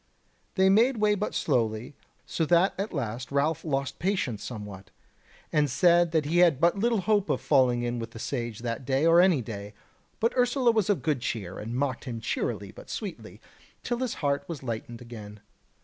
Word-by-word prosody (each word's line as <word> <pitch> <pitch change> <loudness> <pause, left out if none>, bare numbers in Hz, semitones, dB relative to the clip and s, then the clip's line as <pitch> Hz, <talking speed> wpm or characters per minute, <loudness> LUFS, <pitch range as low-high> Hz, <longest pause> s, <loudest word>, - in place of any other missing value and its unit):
They 190 -1 +4
made 230 +6 +4
way 210 -1 +3
but 205 +1 -3
slowly, 115 -3 0 0.3
so 165 - -2
that 175 +3 +4
at 200 +2 -2
last 125 - -4
Ralph 145 +3 0
lost 140 -3 -2
patience 170 - -1
somewhat, 105 -5 -8 0.6
and 150 -2 +3
said 175 +5 +4
that 160 -3 +1
he 165 +4 +1
had 170 -7 +5
but 170 +3 +4
little 225 +1 +1
hope 205 +1 +1
of - - +1
falling 125 -4 +3
in 120 0 -2
with 115 0 -5
the 115 - -12
Sage 115 -2 -4
that 120 +1 -3
day 135 +3 +1
or 165 +1 +7
any 175 -9 +3
day. 100 -2 -7 0.4
But 230 - +1
Ursula 245 0 +3
was 220 -4 0
of 205 - +1
good 150 -6 0
cheer, 95 -7 -4
and 115 +3 -5
mocked 135 -1 -2
him 120 -3 -5 0.2
merrily 100 -4 -3
but - - -13
sweetly, 205 -5 -7 0.4
till 240 -1 -2
his 255 -3 -2
heart 140 -1 -1
was 160 -6 -6
lightened 120 0 -5
again. 105 -3 -10
140 Hz, 190 wpm, -27 LUFS, 120-185 Hz, 0.6 s, or